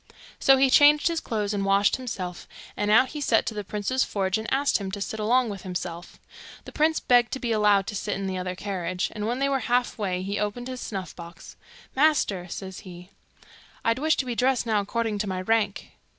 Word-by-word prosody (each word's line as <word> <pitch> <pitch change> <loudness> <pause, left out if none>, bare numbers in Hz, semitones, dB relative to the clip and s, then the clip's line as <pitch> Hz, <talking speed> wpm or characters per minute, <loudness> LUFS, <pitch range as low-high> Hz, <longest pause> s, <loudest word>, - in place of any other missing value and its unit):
So 270 0 +5
he 265 0 +3
changed 295 +4 +6
his 335 -1 -1
clothes, 210 -6 -2
and 200 -1 -1
washed 195 +1 +3
himself, 185 -9 -6 0.3
and 205 0 -1
out 240 +4 +5
he 300 - -6
set 230 -5 +2
to - - -3
the 210 -1 -4
prince's 210 +6 -1
forge 195 0 -1
and 220 - -6
asked 275 -2 +2
him 195 -1 -5
to 200 - -4
sit 220 +2 -4
along 240 +3 +2
with 200 -3 -6
himself. 175 -2 -6 0.5
The - - -9
prince 315 +1 +2
begged 245 -1 +3
to 265 - -3
be 240 -2 -2
allowed 210 -3 +3
to 210 - -5
sit 205 +1 -2
in 195 - -4
the 190 -1 -3
other 180 0 -4
carriage, 180 -2 -3
and 210 0 -4
when 240 +2 -1
they 275 +1 +1
were 275 -1 +1
half 245 -1 0
way 185 -3 -2
he 200 +2 -3
opened 210 +4 -3
his 255 -1 -6
snuff 190 -4 -6
box. 170 0 -11 0.4
'Master,' 265 - +2
says 190 +1 -7
he, 180 -1 -12 0.7
'I'd 230 +2 +2
wish 315 +2 +2
to 265 - -1
be 245 - -3
dressed 250 +1 +1
now 220 -2 +1
according 220 +1 -2
to 210 - -2
my 185 -1 -3
rank. 210 +1 -1
210 Hz, 220 wpm, -25 LUFS, 195-250 Hz, 0.7 s, changed